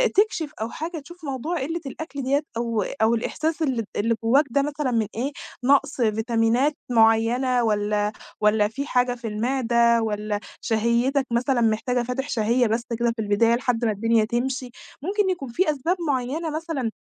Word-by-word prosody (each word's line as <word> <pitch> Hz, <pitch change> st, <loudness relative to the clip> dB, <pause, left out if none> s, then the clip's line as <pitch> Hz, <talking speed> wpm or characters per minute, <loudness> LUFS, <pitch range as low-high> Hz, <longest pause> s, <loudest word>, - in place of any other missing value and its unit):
تكشِف 380 Hz, -7 st, +1 dB
أو 220 Hz, -, -2 dB
حاجة 325 Hz, +4 st, -5 dB
تشوف 345 Hz, +3 st, -13 dB
موضوع 285 Hz, +5 st, -3 dB
قلّة 325 Hz, +5 st, -3 dB
الأكل 280 Hz, +1 st, -6 dB
ديَّة 280 Hz, +3 st, +1 dB
أو 230 Hz, -2 st, 0 dB
أو 225 Hz, +2 st, +1 dB
الإحساس 310 Hz, +8 st, -2 dB
اللي 255 Hz, -7 st, 0 dB
اللي 230 Hz, +2 st, +1 dB
جواك 270 Hz, +7 st, +4 dB
ده 280 Hz, +4 st, +2 dB
مثلًا 290 Hz, -2 st, -2 dB
من 225 Hz, -3 st, +1 dB
إيه؟ 265 Hz, +5 st, -1 dB, 0.3 s
نَقص 280 Hz, 0 st, +3 dB
فيتامينات 230 Hz, +5 st, +2 dB, 0.2 s
معيّنة، 235 Hz, +2 st, +3 dB
والَّا، 210 Hz, -1 st, +1 dB, 0.3 s
والَّا 210 Hz, 0 st, +4 dB
في 265 Hz, +7 st, -5 dB
حاجة 250 Hz, 0 st, +2 dB
في 235 Hz, -1 st, -7 dB
المعدة 235 Hz, +1 st, +2 dB
والَّا 210 Hz, -1 st, -2 dB, 0.2 s
شهيتك 235 Hz, +5 st, +1 dB
مثلًا 245 Hz, +1 st, +1 dB
محتاجة 235 Hz, +2 st, +1 dB
فاتح 250 Hz, +3 st, -3 dB
شهية 235 Hz, +2 st, +2 dB
بس 225 Hz, +2 st, 0 dB, 0.2 s
كده 235 Hz, 0 st, +2 dB
في 225 Hz, -, -3 dB
البداية 220 Hz, +3 st, +3 dB
لحد 240 Hz, -1 st, 0 dB
ما 220 Hz, -, +2 dB
الدنيا 225 Hz, +1 st, +2 dB
تمشي، 250 Hz, +2 st, -2 dB, 0.3 s
ممكن 395 Hz, +5 st, 0 dB
يكون 350 Hz, -8 st, -3 dB
في 310 Hz, +7 st, +1 dB
أسباب 315 Hz, +6 st, -1 dB
معيّنة 280 Hz, +4 st, -1 dB
مثلًا 310 Hz, -8 st, -2 dB
245 Hz, 165 wpm, -24 LUFS, 225-280 Hz, 0.3 s, جواك